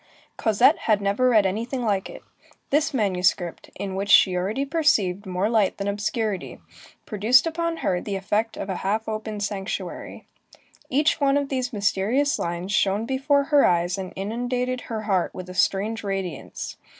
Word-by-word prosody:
Cosette 235 +7 +3
had 215 -2 +4
never 205 +6 +2
read 215 -4 +4
anything 235 +7 -2
like 200 -3 0
it. - - -11 0.5
This 295 +2 +2
manuscript, 185 -6 0
in 195 -1 -5
which 195 +1 -3
she 185 -3 +6
already 205 +10 -1
perceived 220 - +1
more 185 +2 0
light 220 -4 +1
than 200 - -3
obscurity, 205 -1 -2 0.5
produced 220 +7 +4
upon 335 0 -2
her 180 -1 +1
the 200 - -4
effect 210 +4 -1
of - - -4
a 190 - -3
half 215 +3 -1
open 215 -1 -4
sanctuary. 200 -1 -5 0.6
Each 295 +3 +2
one 280 0 +3
of 285 -1 -1
these 255 -2 -2
mysterious 220 +7 +1
lines 175 +3 -3
shone 210 +1 +1
before 275 +3 +1
her 285 - +7
eyes 175 +1 +2
and 185 -1 -5
inundated 245 +5 -2
her 220 -2 -3
heart 190 -4 0
with 185 - -7
a - - -8
strange 200 +5 0
radiance. 195 -4 -5
210 Hz, 160 wpm, -24 LUFS, 195-250 Hz, 0.6 s, her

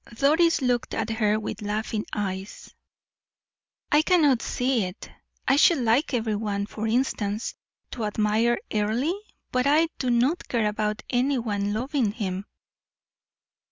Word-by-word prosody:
Doris 315 +4 +3
looked 245 -1 0
at 225 0 -2
her 215 -1 +1
with 220 - -5
laughing 210 +1 -2
eyes. 195 -1 -5 1.2
"I 295 - +6
cannot 310 -8 +3
see 250 -4 0
it. 180 +2 -9 0.4
I 270 - +4
should 330 +2 +6
like 245 +4 +2
every 220 -2 0
one, 205 -1 -2
for 215 +1 -4
instance, 220 -3 -1 0.4
to 230 -3 -3
admire 215 +3 +1 0.2
Earle, 220 +9 +1 0.4
but 255 +2 +1
I 315 +3 +4
do 255 - -1
not 250 +8 +1
care 230 -3 0
about 210 0 -2
any 260 +2 +2
one 205 -4 -1
loving 240 0 0
him." 195 -4 -3
225 Hz, 135 wpm, -25 LUFS, 210-265 Hz, 1.2 s, I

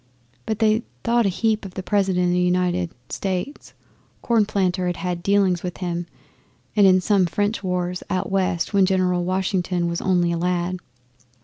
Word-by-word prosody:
But 220 - -1
they 220 0 +3 0.2
thought 235 -2 +2
a - - +2
heap 220 +3 0
of 190 -2 -9
the 190 - -4
President 190 -2 +1
of 175 - +2
the 180 - +2
United 180 -1 +1 0.2
States. 195 +9 -4 0.5
Cornplanter 195 -5 +1
had 175 - -2
had 180 -2 -3
dealings 195 -2 +2
with 180 -1 -5
him 175 -2 -3 0.7
in 190 -3 +5
some 195 -2 +2
French 205 +4 -1
wars 180 -1 -2
out 185 +1 -2
West 185 -2 0
when 195 -2 +4
General 180 -2 +1
Washington 185 -1 -1
was 170 0 -2
only 175 -2 +2
a 170 - -1
lad. 180 +1 -1
185 Hz, 165 wpm, -22 LUFS, 180-200 Hz, 0.7 s, in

